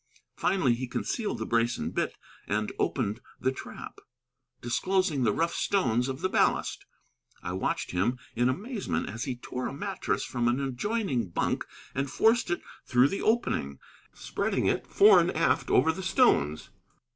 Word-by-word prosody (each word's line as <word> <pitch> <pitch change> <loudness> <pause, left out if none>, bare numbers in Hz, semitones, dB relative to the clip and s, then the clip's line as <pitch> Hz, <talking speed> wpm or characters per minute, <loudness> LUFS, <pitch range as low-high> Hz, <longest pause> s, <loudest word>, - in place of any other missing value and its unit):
Finally 140 -11 +2
he 125 +2 -3
concealed 210 - -2
the 110 - -4
brace 115 +1 +1
and - - -4
bit - - -1 0.3
and 105 +1 -1
opened 115 -3 -1 0.2
the 130 - +1
trap, 130 - -9 0.6
disclosing 180 +4 0
the 115 -4 +3
rough 165 +8 0
stones 125 - +1
of 135 0 -5
the - - +2
ballast. - - +1 0.6
I 90 - -3
watched 95 - -2
him 105 +8 0 0.2
in 120 +2 +2
amazement 210 - -2
as 115 +1 -4
he 130 - -3
tore 125 +1 -5
a - - -5
mattress 195 +7 -2
from 120 -1 -1
an 120 +2 +2
adjoining 135 - -1
bunk 85 - -1 0.3
and 135 +1 -1
forced 225 - +3
it 175 - -1 0.2
through 125 +2 +4
the 195 - -3
opening, 215 - 0 0.3
spreading - - -2
it - - 0
fore - - +7
and - - +2
aft - - +2
over 160 +5 +4
the 165 - -6
stones. 190 - +2
130 Hz, 160 wpm, -28 LUFS, 120-190 Hz, 0.6 s, fore